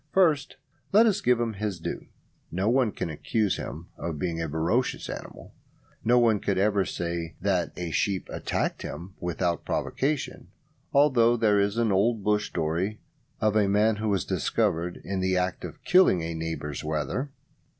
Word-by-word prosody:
First 160 -7 +3 0.4
let 215 +3 +7
us 215 -4 +2
give 125 -1 +3
him 115 -2 -1
his 100 -3 -3
due. - - -5 0.4
No 95 +4 -1
one 125 -2 +3
can 85 - -4
accuse 105 +6 0
him 80 +7 -7
of 85 -2 -3
being 85 +1 -2
a 80 - -2
ferocious 85 - 0
animal. - - -8 0.5
No 120 +2 +4
one 115 -4 +4
could 100 -1 -1
ever 100 0 +2
say 85 -1 -4
that 95 -4 0
a 85 -2 -3
sheep 95 +5 0
attacked - - -2
him 85 +5 -7
without 85 -1 -1
provocation; 140 0 -2 0.4
although 125 -5 +4
there 105 -3 +3
is 100 +2 +1
an 115 -2 +2
old 105 +3 +2
bush 105 0 +1
story 85 +7 -2 0.4
of 110 -1 +2
a 105 -2 +3
man 105 +2 +3
who 110 0 -1
was 100 -4 +1
discovered 85 +2 0
in 95 -1 -3
the 95 0 +1
act 90 0 -1
of - - -8
killing 180 - +5
a 85 0 -3
neighbour's 80 -3 -4
wether. 75 - -2
100 Hz, 170 wpm, -27 LUFS, 85-115 Hz, 0.5 s, let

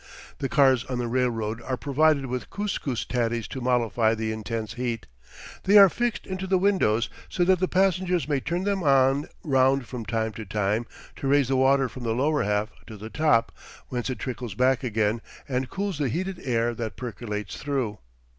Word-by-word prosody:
The 135 - -2
cars 135 -4 +4
on 125 - -3
the 120 -1 -2
railroad 115 -2 -1
are 130 +1 -3
provided 140 +4 +2
with 125 -1 -4
kus 205 -1 -2
kus 125 -5 -3
tatties 120 -2 -1
to 130 - -6
mollify 115 -2 +2
the 110 0 -2
intense 110 0 -4
heat. 120 -2 -3 0.6
They 205 +2 +6
are 200 -1 +10
fixed 240 +3 -2
into 190 0 -4
the 190 0 +3
windows 180 - +2 0.2
so 180 - +1
that 185 0 +3
the 185 - +1
passengers 185 -2 +1
may 145 -2 +1
turn 170 +7 -2
them 200 -2 0 0.6
round 135 -2 +3
from 120 -3 -6
time 110 +1 -1
to 110 - -7
time 105 +3 0 0.3
to 135 - -3
raise 140 -2 +3
the 135 - +2
water 135 +1 +4
from 130 - -10
the 115 -2 -1
lower 145 +4 +1
half 105 +1 0 0.2
to 110 - -9
the 110 +2 -9
top, 150 -7 +2 0.4
whence 125 0 -3
it 130 - -3
trickles 125 -5 -5
back 130 +3 +2
again 110 -1 0 0.3
and 130 -1 -2
cools 195 -5 -3
the 140 -3 +1
heated 185 +7 -3
air 120 -2 +1
that 115 -1 -5
percolates 105 -5 -5
through. 130 -8 -2
125 Hz, 190 wpm, -26 LUFS, 115-150 Hz, 0.6 s, are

